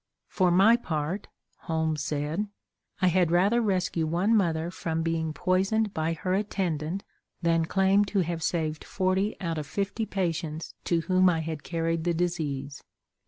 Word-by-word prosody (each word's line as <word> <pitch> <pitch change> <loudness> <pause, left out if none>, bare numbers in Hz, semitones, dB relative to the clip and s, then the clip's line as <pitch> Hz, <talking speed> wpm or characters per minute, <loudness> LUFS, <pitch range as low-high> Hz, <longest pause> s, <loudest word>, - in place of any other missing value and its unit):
"For 185 -2 +2
my 195 +7 +6
part," 165 -2 -3 0.3
Holmes 160 -2 -1
said, 150 +8 -2 0.6
"I - - +6
had 180 -1 +3
rather 195 +8 +3
rescue 185 -6 0
one 180 +8 +2
mother 170 -4 +1
from 165 -2 -2
being 165 -1 -1
poisoned 195 +5 +1
by 160 +1 0
her 185 +3 -2
attendant 190 -3 -1 0.4
than 165 -1 +3
claim 195 +3 +3
to 200 -1 +1
have 170 -1 -2
saved 155 -2 -1
forty 190 +2 0
out 165 -4 -2
of 150 - -6
fifty 205 +4 -2
patients 165 -4 -3
to 170 -1 +2
whom 185 +2 +4
I 165 -2 +1
had 160 -2 -4
carried 165 0 -1
the 170 0 +1
disease." 150 -5 -2
170 Hz, 155 wpm, -27 LUFS, 160-190 Hz, 0.6 s, my